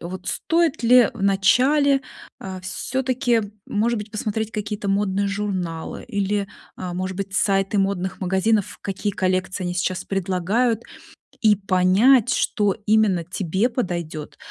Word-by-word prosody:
вот 180 +2 -7
стоит 330 -4 0
ли 240 -1 +6
вначале, 260 +9 +3 0.4
а, 190 -1 -7
всё-таки, 245 +4 -1 0.2
может 230 +2 0
быть, 210 +1 -7
посмотреть 215 +1 -3
какие-то 210 -1 -4
модные 200 0 +1
журналы 190 -5 -3
или, 200 -2 -1 0.3
а, 180 -1 -5
может 185 +1 -3
быть, 195 -1 -5
сайты 195 +1 +1
модных 195 -1 -1
магазинов, 190 +3 0
какие 200 +1 -3
коллекции 185 0 -1
они 175 0 -2
сейчас 185 +1 -1
предлагают, 195 +5 0 0.6
и 215 -3 +5
понять, 195 +6 +4
что 205 -3 +1
именно 210 -5 +3
тебе 190 +5 -1
подойдет, 170 - -4
200 Hz, 125 wpm, -22 LUFS, 185-225 Hz, 0.6 s, ли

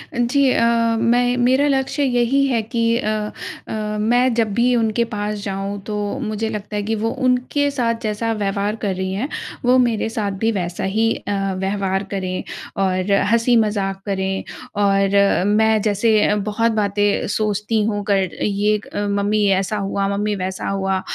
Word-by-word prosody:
जी, 255 +3 +2
अ, 230 - +2 0.3
मैं 245 +1 +2
मेरा 260 +4 +3
लक्ष्य 275 +1 0
यही 260 +1 +2
है 235 -4 +1
कि 230 +2 -3 0.2
अ, 215 - -1 0.6
अ, - - -5 0.3
मैं 245 +3 +2
जब 225 -3 0
भी 245 +3 +3
उनके 230 0 +1
पास 210 -2 -4
जाऊँ, 195 0 -4
तो 210 - -4 0.2
मुझे 220 -2 -2
लगता 210 -1 -5
है 205 - 0
कि 220 +2 -1
वो 220 +1 -1 0.2
उनके 255 +3 +1
साथ 240 -4 0
जैसा 220 +1 -1
व्यवहार 205 0 -1
कर 195 -3 -1
रही 190 0 -3
हैं, 215 +8 -2 0.4
वो 250 +1 +5
मेरे 235 -3 +1
साथ 210 -3 -2
भी 225 0 +2
वैसा 175 -4 -3
ही 220 +4 +1
अ, - - -5 0.2
व्यवहार 195 0 -1
करें 185 -2 -3 0.4
और 185 +1 0 0.2
हँसी-मज़ाक 215 -5 +2
करें। 190 -1 -2 0.4
और 195 -1 +3
मैं 220 +1 +3
जैसे 215 +1 +2
अ, 210 - +2
बहुत 210 +3 0
बातें 205 -1 +1
सोचती 210 +1 0
हूँ 205 -2 -1
कर 195 -2 +2
ये 205 +1 +1
एक 210 - -6
मम्मी 205 +1 +1 0.2
ऐसा 210 +2 -3
हुआ, 195 0 -1
मम्मी 210 +1 -1
वैसा 185 -1 -4
हुआ, 195 -1 -1
210 Hz, 165 wpm, -20 LUFS, 200-230 Hz, 0.6 s, वो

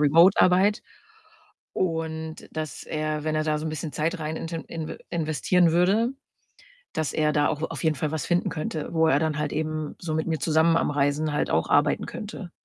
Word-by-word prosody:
remote 165 +6 +6
Arbeit. 190 +3 +4 0.9
Und 160 -2 -3
dass 155 -5 -4
er, 155 -1 -2
wenn 155 0 0
er 155 - +1
da 155 -1 +1
so 155 - -5
'n - - -2
bisschen 155 0 -5
Zeit 165 +3 -1
rein 155 +1 -3
int 165 - -6
inv 165 -1 -5
investieren 165 +1 +2
würde, 195 +7 +3 0.8
dass 155 -2 -1
er 150 -1 +2
da 145 -1 +3
auch 150 - -2
auf - - -5
jeden 160 -1 +2
Fall 150 +3 -1
was 160 - -2
finden 175 0 +1
könnte, 155 0 -4
wo 160 0 +4
er 140 - +4
dann 155 -2 0
halt 150 -1 -2
eben 155 -1 -3
so 160 -3 -3
mit 160 - -1
mir 160 -1 0
zusammen 160 +2 +3
am - - 0
Reisen 145 +2 +1
halt 150 - 0
auch 80 +1 +1
arbeiten 145 +1 +3
könnte. 205 -4 -7
155 Hz, 200 wpm, -25 LUFS, 150-165 Hz, 0.9 s, remote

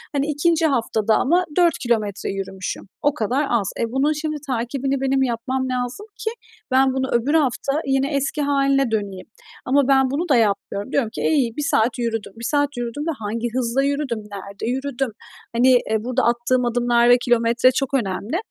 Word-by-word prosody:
Hani, 280 +1 +1
2. 320 +2 +1
haftada 225 -6 +1
ama 350 +7 +2
4 345 -2 +4
kilometre 215 -5 -1
yürümüşüm. 195 0 -5
O 290 - +2
kadar 260 +3 0
az. 220 -5 +1
E, - - +1
bunun 275 +4 +2
şimdi 305 0 -3
takibini 265 +2 -2
benim 270 0 +2
yapmam 255 +2 -2
lazım 250 +9 -3
ki 440 - -1 0.4
ben 265 0 +4
bunu 265 0 -1
öbür 240 +5 +1
hafta 285 0 +1
yine 270 +2 0
eski 280 +2 -1
hâline 275 -3 +2
döneyim. 200 -4 -3 0.4
Ama 275 +1 +3
ben 265 -1 +3
bunu 330 +5 -2
da 270 - +5
yapmıyorum. 200 0 0
Diyorum 255 -7 +1
ki, - - -5
e, - - +2
iyi, 280 -6 +3
1 295 - -1
saat 235 +3 +2
yürüdüm. 225 -4 -3
1 230 - -7
saat 285 +1 0
yürüdüm 240 +4 -4
ve 330 - +1
hangi 225 +3 -3
hızla 250 +1 0
yürüdüm, 280 -4 -1
nerede 200 -1 -8
yürüdüm? 265 -1 -2 0.4
Hani, 245 +2 +4 0.2
eee, 220 - +2
burada 255 +2 0
attığım 240 +1 +1
adımlar 240 0 +2
ve 245 - +7
kilometre 240 +1 +3
çok 275 0 -2
önemli. 225 - -1
255 Hz, 180 wpm, -21 LUFS, 230-275 Hz, 0.4 s, ve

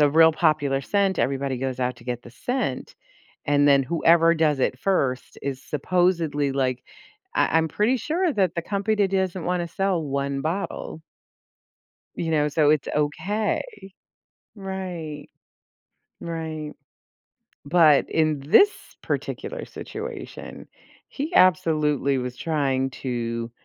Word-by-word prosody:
a 145 -1 +5
real 160 +2 +6
popular 155 -4 +1
scent, 195 +4 0
everybody 135 0 0
goes 130 0 -3
out 125 0 -1
to 115 - -16
get 120 -1 -4
the 120 - -12
scent, 175 - -3 0.5
and 145 0 +3
then 140 -1 +5
whoever 165 +3 +4
does 155 -3 +2
it 130 -1 0
first 135 -9 -1
is 135 -1 -4
supposedly, 165 -2 0
like, 130 -2 -1 0.5
I 160 - +2
I'm 160 0 0
pretty 215 - +1
sure 335 - 0
that 190 - +1
the 170 - -1
company 200 +2 0
doesn't 190 -2 -1
wanna 175 -1 -1
sell 190 -1 0
one 140 -1 -2
bottle. 160 0 -4 1.1
You 165 - -3
know, 150 -2 +2
so 150 0 +3
it's 150 -3 +1
okay. 195 +9 0 0.9
Right. 185 -7 -6 1.0
Right. 160 -2 -5 0.9
But 155 -1 +4
in 155 -3 +1
this 170 - +6 0.3
particular - - -4
situation, - - -8 0.4
he 305 +5 -5
absolutely 155 -7 +3
was 125 0 -4
trying 135 -4 0
to 115 -2 -4
155 Hz, 125 wpm, -24 LUFS, 140-185 Hz, 1.1 s, real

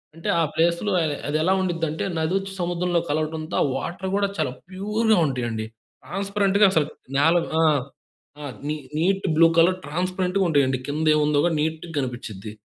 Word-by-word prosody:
అంటే 165 - -5
ఆ - - +3
ప్లేస్‌లో 170 +5 +1
ఆహ్, 155 -3 0
అది 150 - +1
ఎలా 185 +3 +3
ఉండిద్దంటే 165 -4 -2 0.2
నదొచ్చి 195 +5 -1
సముద్రంలో 175 0 0
కలవటంతో 155 +1 -2
ఆ - - +2
వాటర్ 185 +6 -4
గూడా 200 0 +1
చాలా - - 0 0.2
ప్యూర్‌గా 210 +3 +1
ఉంటయండి. 120 -5 -3 0.4
ట్రాన్స్‌పరెంట్‌గా 200 +1 +2
అసలు 160 -5 +2 0.3
నేల 160 +4 +4 0.3
ఆ! - - +4 0.8
ఆ! - - -6 0.2
నీ 150 - -1 0.2
నీట్ 195 +4 +1
బ్లూ 165 +1 +7
కలర్ 175 +3 +5
ట్రాన్స్‌పరెంట్‌గా 185 +4 -1
ఉంటయండి. 135 -4 +2
కింద 155 +2 -1
ఏముందో 150 -1 +2
గూడా 170 -2 +1
నీట్‌‌గా 160 +2 -3
గనిపిచ్చిద్ది. 120 -6 -5
165 Hz, 150 wpm, -23 LUFS, 150-190 Hz, 0.8 s, బ్లూ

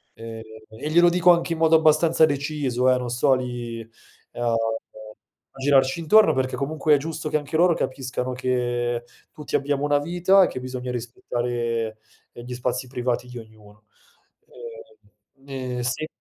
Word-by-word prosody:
Ehm, 115 0 -8 0.3
e 110 +7 -6
glielo 175 +2 +6
dico 180 0 +5
anche 170 0 +1
in 160 - -6
modo 160 0 +5
abbastanza 160 +1 +4
deciso, 140 -4 0
eh, - - +1
non 125 -1 -4
sto 130 +3 +2
lì 120 -2 -5 0.5
a 120 -1 0 1.0
a 135 - -13
girarci 135 +2 +3
intorno, 210 +7 +5
perché 130 0 -1
comunque 150 +1 +1
è - - +3
giusto 155 +1 -5
che 155 - +2
anche 145 +1 -6
loro 175 0 +4
capiscano 130 -2 -3
che 120 -1 -1 0.3
tutti 150 - -5
abbiamo 140 0 0
una 145 0 +2
vita, 175 +5 +3
e - - +3
che 130 - -6
bisogna 125 0 -6
rispettare, 120 -2 -3 0.3
ehm, 120 - -10
gli 125 - -6
spazi 125 +1 -3
privati 125 -1 -2
di 125 0 -9
ognuno. 105 -2 -15 1.5
Ehm, 135 0 -24 0.3
ehm, - - -2
sì. 125 +5 -2
130 Hz, 160 wpm, -23 LUFS, 120-155 Hz, 1.5 s, glielo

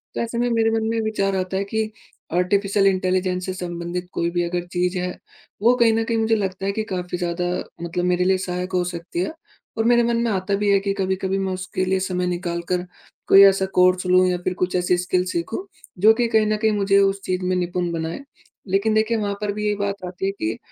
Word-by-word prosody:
तो - - -1
ऐसे 235 0 -3
में, 245 +1 +1
मेरे 225 -1 +2
मन 225 0 0
में 230 0 0
विचार 200 -3 0
आता 185 0 -2
है 195 - 0
कि 220 0 0 0.4
आर्टिफिशियल 195 +2 +2
इंटेलिजेंस 185 -1 0
से 185 - -3
संबंधित 175 0 -5
कोई 170 - 0
भी 175 0 0
अगर 175 0 -2
चीज़ 180 +1 0
है, 180 0 -3 0.4
वो 235 +3 +5
कहीं 235 -2 +4
न 225 0 +1
कहीं 230 0 -1
मुझे 225 0 +2
लगता 195 -2 -3
है 200 - +1
कि 220 +2 -2
काफ़ी 180 -1 -3
ज़्यादा 175 0 -2 0.4
मतलब 170 +1 -2
मेरे 180 0 +2
लिए 190 0 +3
सहायक 180 0 -4
हो 180 -1 +2
सकती 170 0 -5
है 185 - -1 0.4
और 225 - +1
मेरे 240 0 +5
मन 235 0 +1
में 235 - 0
आता 195 0 0
भी 205 +1 0
है 200 - +5
कि 195 0 -1
कभी-कभी 190 0 -1
मैं 190 -1 -1
उसके 185 0 -3
लिए 190 0 +1
समय 185 -1 -1
निकाल 175 -1 -2
कर 180 0 0 0.4
कोई 195 - +8
ऐसा 195 -1 +4
कोर्स 185 0 +4
लूँ 185 0 +5
या 180 -1 +1
फिर 185 - 0
कुछ 180 0 0
ऐसी 180 0 +2
स्किल्स 180 +1 0
सीखूँ, 170 - -3 0.3
जो 215 +4 +7
कि 240 +1 +1
कहीं 220 -2 +3
न 215 0 +1
कहीं 220 0 +2
मुझे 200 -1 +2
उस 195 0 +2
चीज़ 185 0 -2
में 185 0 +1
निपुण 175 -1 -1
बनाए। 165 +3 -3 0.5
लेकिन 200 +3 +1
देखिए, 220 +1 +2
वहाँ 205 -2 -1
पर 210 -1 -1
भी 210 +1 -4
यही 210 0 +1
बात 200 -1 -3
आती 180 +1 -5
है 195 - +1
कि 110 - -3
190 Hz, 235 wpm, -22 LUFS, 180-210 Hz, 0.5 s, कोई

